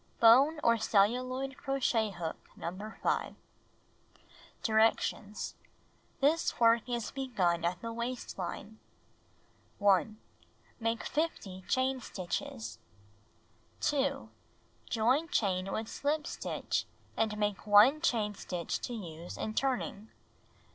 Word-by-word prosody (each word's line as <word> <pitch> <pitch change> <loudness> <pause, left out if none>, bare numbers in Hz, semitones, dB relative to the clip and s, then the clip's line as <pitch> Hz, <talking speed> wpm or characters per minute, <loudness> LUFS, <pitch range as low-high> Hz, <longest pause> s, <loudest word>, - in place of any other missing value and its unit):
Bone 270 +7 +7
or 230 -1 +4
celluloid 255 +6 +1
crochet 265 -6 +1
hook 175 -4 -6
No. 200 +6 -6
5. - - 0 1.3
Directions: 220 -1 +1 0.7
This 310 +4 +2
work 230 +1 +4
is 240 -2 -2
begun 190 -11 0
at 175 +3 -1
the 230 0 -4
waist 235 +2 -4
line. 205 +4 -5 1.0
1. 205 +1 +3 0.6
Make 230 0 -1
50 225 - -2
chain 260 0 +1
stitches. 235 +6 -5 1.0
2. 275 -1 0 0.6
Join 250 +8 +2
chain 190 -5 0
with 220 - -2
slijo 295 +6 -1
stitch - - -2 0.3
and 215 -1 0
make 205 -1 -1
1 220 +9 +7
chain 220 -9 +1
stitch 180 -4 -4
to 245 - -4
use 170 -5 -7
in 215 - -3
turning. 240 -5 -1
225 Hz, 105 wpm, -32 LUFS, 205-260 Hz, 1.3 s, Bone